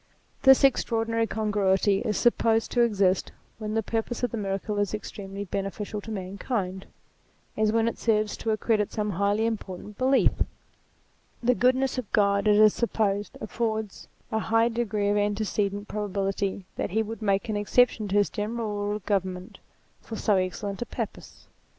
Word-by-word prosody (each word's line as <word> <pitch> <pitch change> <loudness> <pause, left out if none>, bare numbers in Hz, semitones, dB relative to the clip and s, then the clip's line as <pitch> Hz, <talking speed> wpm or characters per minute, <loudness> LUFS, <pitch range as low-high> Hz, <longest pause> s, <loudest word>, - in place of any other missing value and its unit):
This 265 0 +7
extraordinary 230 -3 +2
congruity 205 -2 +1
is 210 -2 -1
supposed 225 -1 +2
to 245 - +2
exist 195 -5 +2 0.3
when 215 0 -3
the 225 - +1
purpose 230 +3 -3
of 245 - +1
the 235 - -3
miracle 200 0 -2
is 205 +1 0
extremely 200 -1 -7
beneficial 200 +2 -4
to 225 - -10
mankind, 190 -1 -3 0.7
as 215 0 +2
when 225 0 +2
it 230 - -3
serves 215 -2 +1
to 225 - -4
accredit 215 -1 +1
some 210 -1 -2
highly 200 +4 +1
important 210 -2 -5
belief. 265 +1 +4 1.1
The 250 +1 +4
goodness 255 +1 +2
of 235 - -7
God, 200 -1 +3
it 210 - +6
is 215 0 +6
supposed, 205 -3 -1
affords 220 -2 -3 0.2
a 220 - +1
high 225 +1 +2
degree 215 -3 -1
of 205 - +2
antecedent 205 0 -1
probability 195 -2 -2
that - - -1
he 220 +4 +1
would 225 +1 -7
make 200 +1 +1
an 215 - -2
exception 215 +1 +2
to 195 - -2
his 205 -1 +3
general 215 +1 -3
rule 205 0 -2
of 210 - -8
govern 190 -3 0
ment, 180 +1 -11 0.4
for 225 - -7
so 210 -1 +2
excellent 190 +2 -3
a 240 - -3
purpose. - - -7
210 Hz, 165 wpm, -26 LUFS, 200-225 Hz, 1.1 s, This